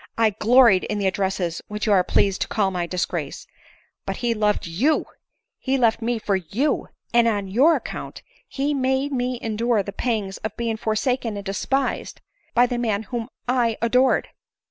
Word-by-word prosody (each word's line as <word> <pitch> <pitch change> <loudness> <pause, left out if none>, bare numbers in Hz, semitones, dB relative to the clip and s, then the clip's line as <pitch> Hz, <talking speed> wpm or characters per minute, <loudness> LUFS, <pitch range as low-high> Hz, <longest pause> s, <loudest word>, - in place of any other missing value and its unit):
I 225 -1 +4
gloried 225 -1 +5
in 210 - -2
the 200 - -1
addresses 190 -3 -1
which 210 0 -4
you 215 - +1
are 190 -3 +5
pleased 195 +1 +1
to - - 0
call 200 -4 0
my 175 -2 -2
disgrace. 180 +1 -3 0.6
But - - -3
he 240 -1 0
loved 210 -1 0
you 225 - +1 0.3
— - - -55
he 265 +1 0
left 230 -2 +2
me 235 +1 0
for 210 -2 0
you— 200 - -1 0.3
and 235 -1 +5
on 205 -3 0
your 265 - +4
ac - - -2
count - - -7 0.2
he 285 +2 -1
made 265 +1 0
me 250 -1 -1
endure 225 -1 +1
the 200 - -7
pangs 215 -6 -2
of 215 - -6
being 230 -2 -2
forsaken 220 +1 -1
and 200 - -7
despised 265 +7 -2 0.4
by 245 - +6
the 245 -1 -2
man 220 -3 0
whom 235 +1 -5 0.2
I 240 -3 +1
adored. 250 +3 +2
225 Hz, 185 wpm, -23 LUFS, 200-250 Hz, 0.6 s, by